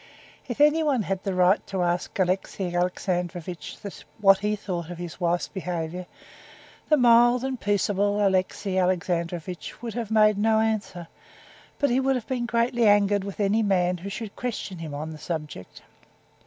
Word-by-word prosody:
If 245 +1 -5
anyone 295 -4 +3
had 195 -1 -2
had - - -34
the 195 -2 -1
right 180 +2 +4
to 190 -2 -1
ask 175 +1 -1
Alexey 185 -1 -1
Alexandrovitch 180 -1 -2 0.4
what 195 -2 +6
he 210 +1 0
thought 175 -5 -5
of 175 - -7
his 175 +1 -8
wife's 175 0 +1
behavior, 180 -2 -4 0.8
the 305 - +5
mild 240 0 +5
and 265 -2 -3
peaceable 205 0 +1
Alexey 190 0 0
Alexandrovitch 175 -1 -2
would 230 -2 -4
have 230 -3 -4
made 215 -2 +4
no 220 +1 +3
answer, 215 -6 -2 0.7
but 285 -4 +1
he 250 - +3
would 265 0 +2
have 245 - -3
been 245 -2 -2
greatly 235 0 +2
angered 205 -1 +4
with 200 +1 -7
any 205 +2 +2
man 180 -3 +1
who 195 +4 -6
should 205 +1 -6
question 215 -7 -4
him 155 -3 -6
on 155 +2 -5
that 155 - -9
subject. 150 - -6
195 Hz, 165 wpm, -25 LUFS, 180-220 Hz, 0.8 s, what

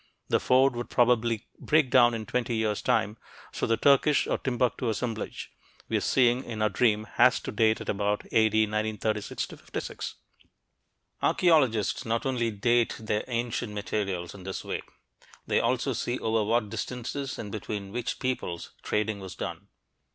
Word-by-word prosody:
The - - +3
Ford 130 0 +4
would 120 0 -4
probably 120 -2 +2
break 150 -4 +2
down 120 -2 +6
in 110 -1 -5
twenty 120 0 -1
years' 110 -2 0
time, 105 +2 +1 0.3
so - - -2
the 115 - +2
Turkish 140 +3 +4
or - - -1
Timbuktu 125 -1 0
"assemblage" 110 0 -4 0.4
we're - - +1
seeing 125 0 +3
in 110 -2 -3
our 110 - +3
dream 110 -3 +2
has - - +6
to - - -5
date 110 -1 +2
at - - -7
about 105 0 0
A.D. 110 -1 +4
1936 110 0 -2
56. - - -6 1.1
Archeologists 135 - +3
not 115 +2 -1
only 125 -3 0
"date" 120 +3 +1
their 110 -1 -1
ancient 120 -2 -2
materials 100 -4 -3
in 100 - -11
this 95 +1 -6
way; - - -3 0.6
they - - +2
also 130 +3 +1
see 120 +1 -2
over 110 -2 +1
what 110 -1 +1
distances 130 +2 -4
and 105 -2 -6
between 100 -2 -5
which 120 +2 -3
peoples 125 -10 -3
trading 105 -1 -1
was 95 -3 -8
done. - - -6
115 Hz, 155 wpm, -28 LUFS, 105-125 Hz, 1.1 s, down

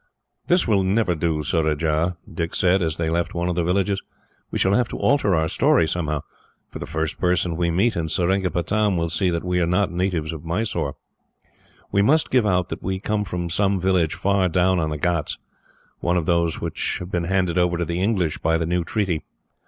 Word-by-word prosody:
"This 175 -4 +3
will 105 -3 +3
never 95 0 +1
do, 80 -1 -1
Surajah," 80 +2 0 0.2
Dick 85 +1 -3
said, 95 0 +3
as 80 -2 -1
they 80 -1 -1
left 85 +1 -1
one 85 +1 -1
of - - 0
the 85 - +1
villages. 95 +3 0 0.5
"We - - -3
shall 95 - +2
have 120 +1 +2
to - - -6
alter 120 -10 +2
our 80 0 +1
story 80 0 +3
somehow, 75 -4 -2 0.5
for - - -7
the - - -6
first 80 0 -3
person 90 -1 +1
we 85 0 0
meet, 95 +8 +2
in 80 -1 -2
Seringapatam, 95 +3 +1
will 85 -1 -1
see 90 +2 +1
that 85 -1 -2
we 90 0 0
are 85 - +1
not 90 +2 +1
natives 85 -3 -1
of 80 - -8
Mysore. 85 -4 -2 1.0
We 100 - +3
must 150 +9 +3
give 125 -4 +3
out 90 -2 +1
that - - -5
we 95 0 -2
come 105 +1 -1
from 90 -3 -4
some 100 +2 +1
village 90 -3 +1
far 100 -2 +1
down 90 +1 +2
on 80 -2 0
the 75 - -3
ghauts 85 -1 -1 0.6
one 85 +1 +1
of 85 - -1
those 85 -1 +1
which - - -3
have 90 +1 -8
been 85 -1 -1
handed 90 -1 +1
over 90 -1 +2
to 85 - -1
the 85 +3 -2
English 95 -6 0
by 80 +1 +1
the 80 - -1
new 90 +1 0
treaty. 90 -4 -1
90 Hz, 210 wpm, -23 LUFS, 85-95 Hz, 1.0 s, This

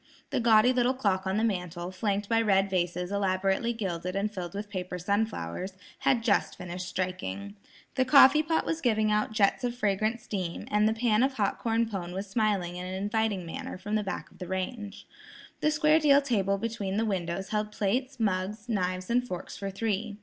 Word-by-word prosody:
The - - +1
gaudy 230 +1 +5
little 250 +1 +2
clock 195 -6 0
on 190 +2 0
the 220 - +1
mantel, 180 -4 -2
flanked 200 +1 -1
by 225 +1 +3
red 195 -3 +2
vases 180 0 -1
elaborately 195 +3 +1
gilded 185 -5 -3
and 205 +2 -1
filled 180 -2 -5
with 205 +1 -4
paper 185 -3 -4
sunflowers, 190 - -2 0.3
had 240 -4 +2
just 215 -4 +1
finished 180 0 -6
striking. 140 - -4 0.4
The 260 - +2
coffee 275 +2 +7
pot 320 +1 0
was 325 0 -2
giving 215 -3 +2
out 210 +1 +1
jets 215 +2 +2
of 245 -1 -1
fragrant 215 0 0
steam, 190 -6 -4
and 210 +1 +4
the 220 - -1
pan 225 -1 +2
of 265 +1 +2
hot 205 -6 0
corn 230 0 +1
pone 180 -5 -5
was 195 +2 -3
smiling 195 -4 0
in 180 - -5
an 185 - -4
inviting 205 -1 -1
manner 165 - -6
from 205 +3 -6
the 215 - +2
back 195 - -5
of - - -20
the 180 - -6
range. 200 +3 -4 0.5
The 305 - +2
square 305 +1 +4
deal 285 -2 +6
table 200 -8 +1
between 205 -2 -3
the 225 - +1
windows 190 -1 -2
held 210 0 -1
plates, 250 +6 -1
mugs, 205 +1 -1
knives 185 -4 -1
and 245 +1 +2
forks 180 -4 -6
for 195 - -4
three. 205 +1 -2
205 Hz, 195 wpm, -28 LUFS, 185-225 Hz, 0.5 s, coffee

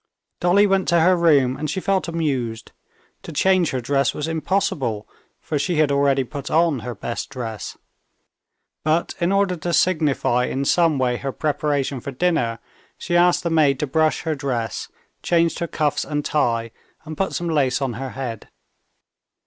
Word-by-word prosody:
Dolly 180 +4 +4
went 195 -2 +1
to 170 -1 +3
her 180 +3 +5
room 145 -7 +3
and 155 - -3
she 170 - -2
felt 190 -1 0
amused. 135 -9 -2 0.5
To - - -9
change 185 +2 +2
her 130 - -2
dress 135 +2 0
was 150 - -3
impossible, 155 - -1 0.3
for 150 - -3
she 175 +5 -1
had 155 -2 +3
already 140 -1 +2
put 140 +2 -7
on 165 -4 +2
her 120 +1 -6
best 115 +3 -5
dress. 115 -5 -6 1.1
But 155 +3 +1
in 170 +2 +1
order 195 -2 +2
to 170 +2 -3
signify 150 -9 +2
in 135 +2 -2
some 165 -1 +3
way 125 -2 +1
her 135 +2 -4
preparation 145 -2 -1
for 130 - -7
dinner, 135 -5 0 0.4
she 175 - -3
asked 175 0 +4
the 170 - -1
maid 145 -5 +3
to - - 0
brush 155 +3 +1
her 160 -1 -1
dress, 125 -7 -3 0.3
changed 170 -1 +1
her 170 - -2
cuffs 150 -2 0
and 150 -1 -3
tie, 115 -6 0 0.3
and 155 0 -6
put 195 +4 -1
some 175 - -2
lace 140 -6 +1
on 135 -3 -2
her 130 +4 -5
head. 120 -5 -5
150 Hz, 175 wpm, -22 LUFS, 130-170 Hz, 1.1 s, her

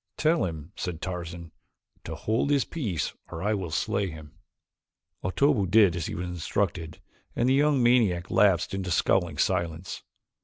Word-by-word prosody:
"Tell 160 - +2
him," 80 -1 -6
said 90 -4 -4
Tarzan, 85 -2 -6 0.5
"to - - -5
hold 110 +6 0
his 140 -2 +3
peace 105 - -3 0.2
or 80 - -6
I 105 +1 +1
will 95 -5 -3
slay 95 +5 0
him." 80 -2 -10 0.9
Otobu 110 0 +2
did 100 -3 +5
as 85 -3 -3
he - - -5
was 90 - -3
instructed 85 -1 -2 0.4
and 120 - +1
the 130 - +4
young 140 -2 +3
maniac 110 -8 +3
lapsed 95 -2 +3
into 95 -1 -3
scowling 85 -2 +1
silence. 85 +3 -1
90 Hz, 155 wpm, -27 LUFS, 85-110 Hz, 0.9 s, did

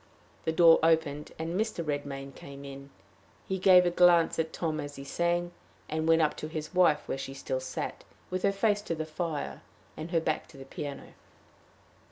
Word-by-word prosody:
The 160 - +2
door 165 0 +7
opened, 160 -2 +1
and 160 +1 -3
Mr. 210 -3 -1
Redmain 140 -2 -4
came 140 0 -10
in. 140 0 -9 0.6
He 190 0 -2
gave 180 -1 +7
a 175 - +2
glance 175 -2 +5
at 160 0 0
Tom 160 -2 -2
as 145 -1 -6
he 140 - -8
sang, 175 +4 0 0.4
and 160 +1 -2
went 165 0 +5
up 150 - +1
to 155 - -5
his 155 +1 -6
wife 175 -5 +3
where 135 - -3
she 135 0 -6
still 130 -1 -3
sat, 130 - -5 0.3
with 185 0 -1
her 200 - +3
face 205 +1 +1
to 170 -5 -3
the 155 0 -3
fire, 155 -1 -4 0.3
and 155 +2 -6
her 170 -1 +2
back 160 - -2
to 145 - -16
the 135 - -10
piano. 140 +1 -7
160 Hz, 195 wpm, -29 LUFS, 145-175 Hz, 0.6 s, door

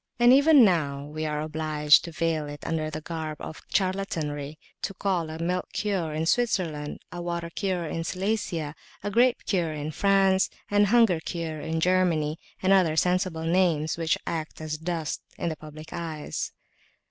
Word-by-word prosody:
And 240 +1 +7
even 285 -2 +7
now 145 -7 +1
we 155 +1 -4
are 150 0 -2
obliged 155 -1 +3
to 170 - -6
veil 160 -2 -1
it 145 0 -9
under 155 -1 -1
the 155 0 -5
garb 155 -1 -5
of - - -8
charlatanry 160 -7 -1 0.2
to 195 - -3
call 180 -5 -1
it 160 +1 -6
a - - -2
"milk 180 +1 -1
cure" 190 -7 -1
in 155 +1 -1
Switzerland, 170 -9 0
[p.391]a 175 0 -5
"water 170 -1 -3
cure" 185 -2 -1
in 165 +1 -3
Silesia, 180 -5 -2 0.3
a 205 - -2
"grape 240 +3 +3
cure" 170 -5 0
in 150 0 -4
France, 195 +1 +3 0.2
a 205 0 +5
"hunger 215 -5 +4
cure" 160 -2 -4
in 160 0 -2
Germany, 165 -3 +2 0.2
and 190 +1 +5
other 180 -5 +4
sensible 180 -1 +1
names 165 -3 +2
which 165 -1 +1
act 160 -2 -4
as 155 -1 -4
dust 165 -2 -3 0.2
in - - -1
the 160 - -3
public 155 +1 -11
eyes. 160 -3 -4
165 Hz, 170 wpm, -27 LUFS, 155-185 Hz, 0.3 s, And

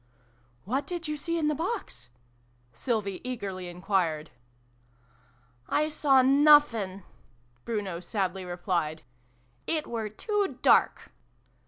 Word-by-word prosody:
" 120 0 -36
What 260 +8 -1
did 345 -2 -4
you 300 - -2
see 335 +3 -2
in 310 -2 +1
the 300 - +2
box? 320 - -4 0.3
" 120 0 -37
Sylvie 200 - -2
eagerly 200 -7 -5
enquired. 175 -4 -1 1.4
"I 305 +1 +1
saw 275 -4 +4
nuffinf" 265 -9 +4 0.6
Bruno 200 -6 -3
sadly 190 0 -2
replied. 175 -3 -2 0.6
"It 310 -2 0
were 225 -2 -4
too 405 - -2
dark - - +3
205 Hz, 115 wpm, -28 LUFS, 175-295 Hz, 1.4 s, saw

